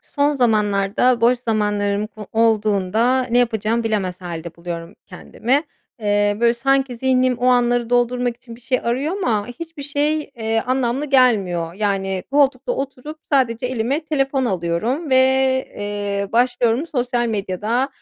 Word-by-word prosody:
Son 290 0 0
zamanlarda 215 0 +2
boş 240 +2 +4
zamanlarım 210 -3 -1
o 210 -2 -8
olduğunda 220 +2 +2
ne 245 0 +1
yapacağımı 230 -1 0
bilemez 195 -5 -2
hâlde 170 -2 -7
buluyorum 170 +1 -7
kendimi. 265 +5 -1 0.4
Eee, 205 -1 +1
böyle 235 0 +4
sanki 270 0 +1
zihnim 255 0 +1
o 250 - 0
anları 245 -1 +2
doldurmak 245 0 +1
için 235 -1 -12
bir - - -19
şey 255 +1 0
arıyor 270 +10 -1
ama 220 - 0
hiçbir 320 +4 -8
şey, 290 +2 0 0.2
eee, 225 0 0
anlamlı 255 +2 0
gelmiyor. 200 - +2
Yani 195 -2 -1
koltukta 275 -2 +2
oturup 275 +3 -6
sadece 250 -4 +1
elime 255 +5 -1
telefon 275 -3 0
alıyorum 220 - -1
ve, 260 - +5 0.6
eee, 205 -1 -3
başlıyorum 245 +3 +2
sosyal 245 -4 -1
medyada, 215 +4 -1
235 Hz, 135 wpm, -20 LUFS, 205-260 Hz, 0.6 s, ve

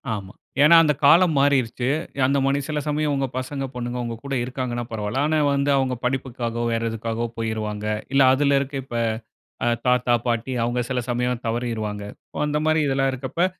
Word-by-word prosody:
ஆமா. 95 -2 -8 0.3
ஏன்னா 160 +3 +8
அந்த 150 -2 +3
காலம் 170 +2 +6
மாறிருச்சு. 130 -3 +2 0.4
அந்த 140 +2 +2
மாரி 140 +1 +2
சில 150 -1 -1
சமயம் 150 0 0
உங்க 135 -1 0
பசங்க 135 +1 -3
பொண்ணுங்க, 120 0 -4
உங்க 115 -1 -4
கூட 140 0 -5
இருக்காங்கன்னா 125 -1 -3
பரவால்ல. 110 +5 -1
ஆனா, 155 0 +2
வந்து 140 0 +1
அவங்க 130 -1 0
படிப்புக்காவோ 125 -2 -2
வேறு 115 0 0
எதுக்காவோ 115 +1 -3
போயிருவாங்க. 110 -2 -3 0.3
இல்ல 135 - +5
அதில 140 +1 +3
இருக்க 140 +1 -4
இப்போ 120 -2 -3 0.8
தாத்தா, 125 -1 +3
பாட்டி 120 +2 -1
அவங்க 120 +1 0
சில 130 -1 0
சமயம் 125 0 -1
தவறிருவாங்க. 115 -3 -2 0.4
அந்த 150 0 0
மாரி 155 0 +3
இதெல்லாம் 135 0 +1
இருக்கிறப்ப 130 +7 -1
125 Hz, 165 wpm, -23 LUFS, 115-140 Hz, 0.8 s, ஏன்னா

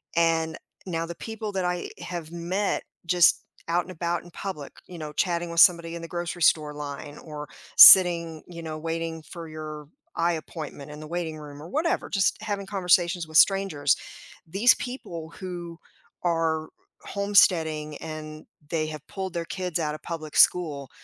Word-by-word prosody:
And 165 -1 +1 0.3
now 165 -2 -2
the 170 0 -7
people 220 -2 -6
that 190 -2 -1
I 180 0 -2
have 170 -2 -6
met 180 +4 -2 0.2
just 175 0 +4 0.3
out 175 +1 +2
and 185 - -11
about 170 0 -2
in 175 - -15
public, 160 -8 -6 0.2
you 180 - -10
know, 155 -2 -6
chatting 170 +1 -1
with 170 - -1
somebody 170 -1 +5
in 170 - -6
the 165 - -7
grocery 175 0 -5
store 150 -2 +3
line 145 0 -7
or 150 -2 -8 0.3
sitting, 170 -4 +9
you 170 -1 -9
know, 155 -1 -5
waiting 165 0 -4
for 165 -1 -9
your 155 -1 -8 0.3
eye 170 +1 +1
appointment 155 -3 -7
in 150 - -9
the 155 - -8
waiting 165 -2 -4
room 145 -1 -10
or 160 - -9
whatever, 320 +4 -1
just 195 +1 +1
having 205 -3 -3
conversations 180 -3 +1
with 155 0 0
strangers, 190 -8 +4 0.5
these 205 +9 +5
people 170 -11 -7
who 175 -3 -7 0.5
are 165 -2 0 0.3
homesteading 160 -7 +2
and 155 -1 -8 0.2
they 160 -2 0
have 155 -1 -8
pulled 190 -2 -5
their 170 -1 -3
kids 180 -2 -3
out 150 -1 -1
of 155 - -11
public 155 -3 -6
school, 145 -7 +3
165 Hz, 170 wpm, -26 LUFS, 155-180 Hz, 0.5 s, sitting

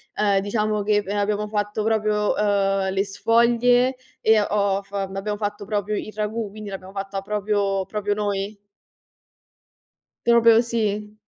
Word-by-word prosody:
ehm, 200 -2 +2
diciamo 210 0 -1
che 210 0 +2
abbiamo 205 +1 -1
fatto 210 0 -2
proprio, 215 -1 +1
uhm, 195 -2 +1
le 195 +1 +1
sfoglie 235 +4 +3 0.3
e 220 -1 +5
ho 200 -1 +1
f 195 0 -26
abbiamo 195 +1 -3
fatto 205 0 -4
proprio 205 +1 -2
il 215 - -5
ragù, 215 0 -2
quindi 210 0 -8
l'abbiamo 190 0 -8
fatta 195 0 -4
proprio 200 -1 -1
proprio 205 -1 -2
noi. 205 0 -2 1.7
Proprio 230 -1 +6
sì. 215 -3 -2
210 Hz, 135 wpm, -23 LUFS, 200-215 Hz, 1.7 s, Proprio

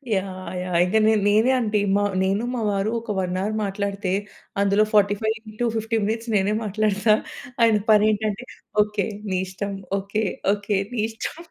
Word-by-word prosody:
Yeah! 185 -1 -4
Yeah! 180 -1 -1
ఇంకా 220 +4 +2
నే 220 - +5
నేనే 215 +5 +4
అంట 215 -3 -1 0.5
నేను 195 +4 +1
మా 235 - -2
వారు 200 +2 0
ఒక 225 -2 -6
వన్ 185 0 -1
అవర్ 215 +2 -1
మాట్లాడితే, 200 -1 -2 0.5
అందులో 200 +1 +4
45 210 +2 +3 0.2
ఇంటూ 235 +3 -2
50 225 +1 -1
మినిట్స్ 225 +2 -2
నేనే 200 +1 +2
మాట్లాడుతా. 210 +1 +2 0.5
ఆయన 225 -2 +5
పని 210 0 +6
ఏంటంటే, 215 +2 -2 0.4
ఓకే 210 -1 -2 0.3
నీ 185 - +1
ఇష్టం. 200 +2 -4 0.3
ఓకే. 205 +3 -2 0.3
ఓకే. 205 0 -1 0.2
నీ 230 - -2
ఇష్టం. 225 +7 -6
210 Hz, 155 wpm, -23 LUFS, 195-220 Hz, 0.5 s, పని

